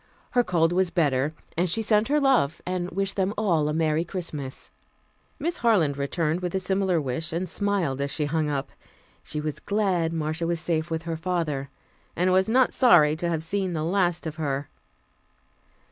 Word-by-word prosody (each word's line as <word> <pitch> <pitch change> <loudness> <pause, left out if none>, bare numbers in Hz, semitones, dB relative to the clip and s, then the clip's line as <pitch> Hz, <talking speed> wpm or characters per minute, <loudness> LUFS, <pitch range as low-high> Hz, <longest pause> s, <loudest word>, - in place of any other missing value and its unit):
Her 245 - +3
cold 170 -4 +2
was 185 0 +2
better, 150 -3 +1 0.2
and 175 +2 +1
she 225 +6 0
sent 215 0 +3
her 295 +2 +2
love, 265 - +2
and 180 -1 -2
wished 195 +2 -2
them 195 +1 0
all 170 -8 +2
a - - 0
merry 160 0 +1
Christmas. 160 -7 -6 0.7
Miss 335 +4 -2
Harland 190 -12 +3
returned 155 +4 -1
a 180 +1 -1
similar 190 -2 +1
wish, 145 +3 -3
and 175 +3 -2
smiled 180 -8 -1
as 140 - -1
she 150 +2 -1
hung 155 0 0
up. 140 -1 -3 0.5
She 150 - -4
was 150 -1 -4
glad 190 -6 0
Marcia 160 +1 -2
was 170 -1 0
safe 160 -1 -1
with 165 0 -2
her 165 -1 -3
father, 160 -5 -2 0.5
and 180 +2 +2
was 190 +2 +3
not 255 +2 +3
sorry 170 - +5
to 170 +1 -1
have 160 -2 -1
seen 190 +2 -2
the 155 -2 -2
last 175 0 +1
of 155 0 -5
her. 140 -3 -2
170 Hz, 180 wpm, -26 LUFS, 155-190 Hz, 0.7 s, sorry